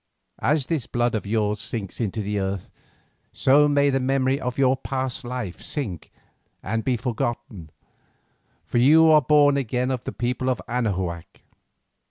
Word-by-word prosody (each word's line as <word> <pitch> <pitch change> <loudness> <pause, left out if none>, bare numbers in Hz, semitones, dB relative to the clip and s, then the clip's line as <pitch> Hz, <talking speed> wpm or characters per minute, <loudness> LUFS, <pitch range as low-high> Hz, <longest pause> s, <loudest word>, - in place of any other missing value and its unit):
"As 145 -1 +1
this 150 -6 -2
blood 120 0 0
of 110 -2 -3
yours 105 -1 0
sinks 105 0 -4
into 110 -1 -2
the 105 0 -2
earth, 95 -1 -4 0.6
so 145 +3 +4
may 145 -1 +3
the 135 - +1
memory 135 +1 +1
of 125 -1 -3
your 135 -1 +3
past 130 0 -3
life 120 -7 -5
sink 105 - -5 0.5
and 110 +3 -2
be 125 -2 0
forgotten, 115 - -4 1.0
for 120 - 0
you 155 +6 +6
are 155 -1 +6
born 145 +1 +4
again 125 0 -1
of 125 -1 -3
the - - -3
people 125 +2 -2
of 125 - 0
Anahuac. 95 -8 -3
125 Hz, 155 wpm, -24 LUFS, 110-135 Hz, 1.0 s, you